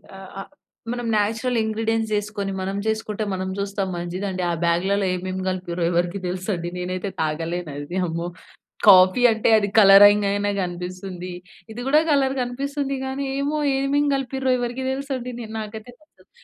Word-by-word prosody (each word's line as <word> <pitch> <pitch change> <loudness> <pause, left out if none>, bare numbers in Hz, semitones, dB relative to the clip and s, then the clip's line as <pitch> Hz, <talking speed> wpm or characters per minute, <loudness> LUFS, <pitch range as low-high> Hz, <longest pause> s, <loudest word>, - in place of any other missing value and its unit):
ఆ! - - -10 0.2
ఆ - - -3 0.5
మనం 245 0 -4
నేచురల్ 225 +4 0
ఇంగ్రీడియెంట్స్ 220 0 -1
యేసుకొని 205 -1 -3
మనం 195 +1 -3
చేసుకుంటే 220 -1 -2
మనం 185 0 -3
చూస్తాం 200 -1 -2
మంచిదండి. 185 +2 -4
ఆ - - +1
బాగ్‌లలో 190 +4 +1
ఏమేమి 185 +1 -4
కలిపిర్రో 180 -2 -2
ఎవరికీ 175 +2 0
తెలుసండి? 180 -1 -3
నేనైతే 185 +2 -3
తాగలేను 165 +1 -2
అది. 145 +5 -6
అమ్మో! 170 +1 -3 0.6
కాఫీ 185 +3 +7
అంటే 220 0 +1
అది 205 -2 +1
కలరింగ్ 205 0 +8
అయినా 205 0 0
కనిపిస్తుంది. 180 +1 -5 0.4
ఇది 230 +2 -7
కూడా 300 +3 +5
కలర్ 270 -2 +2
కనిపిస్తుంది 275 +3 -3
కానీ, 265 +1 -3
ఏమో 290 +2 -1 0.2
ఏమేం 280 +2 +1
కలిపిర్రో 265 0 -1
ఎవరికీ 245 +2 -3
తెలుసండి. 265 -2 -4
నే 235 - -6
నాకైతే 220 +2 -8
నచ్చదు. 310 - -27
205 Hz, 145 wpm, -23 LUFS, 185-245 Hz, 0.6 s, కలరింగ్